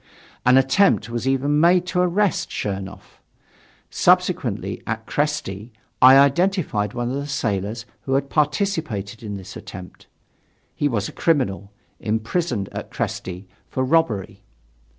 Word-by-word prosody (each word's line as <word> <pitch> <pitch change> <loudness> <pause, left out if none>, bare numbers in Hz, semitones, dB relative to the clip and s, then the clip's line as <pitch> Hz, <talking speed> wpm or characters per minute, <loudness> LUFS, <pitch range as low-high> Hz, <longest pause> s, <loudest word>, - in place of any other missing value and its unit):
An 125 +1 +7
attempt 135 - +3
was 120 +2 -3
even 140 +3 +2
made 175 +2 +4
to 180 0 -1
arrest 180 +1 +1
Chernoff. 95 -1 -6 0.7
Subsequently, - - +1
at 115 0 -3
Kresty, 125 -8 -2 0.3
I 130 +1 +9
identified 140 - +2
one 120 0 -2
of 130 - -2
the 140 0 -4
sailors 110 -5 -2 0.2
who 135 - 0
had 140 0 0
participated 145 - -1
in 105 -3 -5
this 95 - -10
attempt; 90 -1 -10 0.7
he 145 - 0
was 110 -7 -1
a - - -8
criminal, 105 - 0 0.3
imprisoned 110 - -1
at - - -6
Kresty 90 +1 -4 0.2
for 130 - -1
robbery. 130 - 0
130 Hz, 130 wpm, -22 LUFS, 105-150 Hz, 0.7 s, I